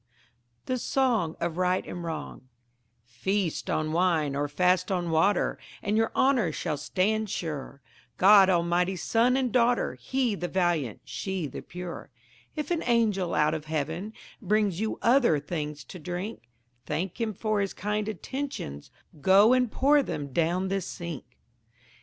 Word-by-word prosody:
The 255 -1 -1
Song 230 -12 +1
of 170 -1 -2
Right 185 0 +1
and 175 - -6
Wrong 155 -5 -6 0.6
Feast 180 - -2
on 155 0 0
wine 165 -4 +1
or 145 +1 0
fast 180 +4 +2
on 175 -3 -1
water, 180 +5 +2 0.2
And 205 +1 0
your 225 +1 +2
honour 255 - +3
shall 150 0 -3
stand 210 +8 0
sure, 145 -6 -5 0.4
God 195 0 +7
Almighty's 175 +1 +1
son 240 +3 +3
and 255 -3 0
daughter 245 +1 +2
He 260 -4 -1
the 175 -3 -3
valiant, 175 - 0
she 190 -4 -3
the 140 - -6
pure; 180 -1 -8 0.5
If 300 0 -4
an 335 -2 +1
angel 210 -7 +2
out 150 +1 +3
of 155 -1 -4
heaven 160 +7 -3 0.3
Brings 205 -3 +1
you 220 0 -2
other 235 - +4
things 150 -1 -5
to 180 - -10
drink, 175 - -6 0.4
Thank 185 +6 -3
him 225 -1 0
for 215 +1 0
his 195 - -3
kind 210 +1 -2
attentions, 220 - -5 0.3
Go 200 - +6
and 250 -3 +2
pour 285 +2 +4
them 145 - -5
down 175 +4 +1
the 195 0 0
sink. 170 -5 -6
185 Hz, 150 wpm, -27 LUFS, 160-220 Hz, 0.6 s, God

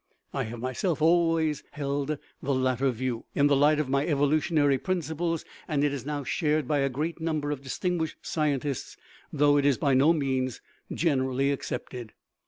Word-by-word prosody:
I - - -1
have 115 +2 -6
myself 130 - -1
always 165 -2 +3
held 145 0 -2 0.2
the 140 - 0
latter 130 +1 +1
view, 125 -1 -3
in 140 - +4
the 145 -1 +4
light 145 +2 +4
of 150 - 0
my 140 +1 +1
evolutionary 145 -1 +2
principles, 165 -1 -2 0.2
and 145 -3 0
it 145 -1 +2
is 140 -1 -5
now 145 -1 -2
shared 150 +1 0
by 145 +1 +1
a 140 0 +2
great 155 +6 -3
number 155 -3 -1
of 145 -2 -4
distinguished 160 +4 -2
scientists, 145 -3 -2 0.3
though 145 0 +4
it 140 - +2
is 140 -4 +3
by 140 -3 +2
no 135 +5 +5
means 130 -5 -1 0.3
generally 135 -3 +1
accepted. 125 -4 -5
145 Hz, 170 wpm, -27 LUFS, 135-155 Hz, 0.3 s, no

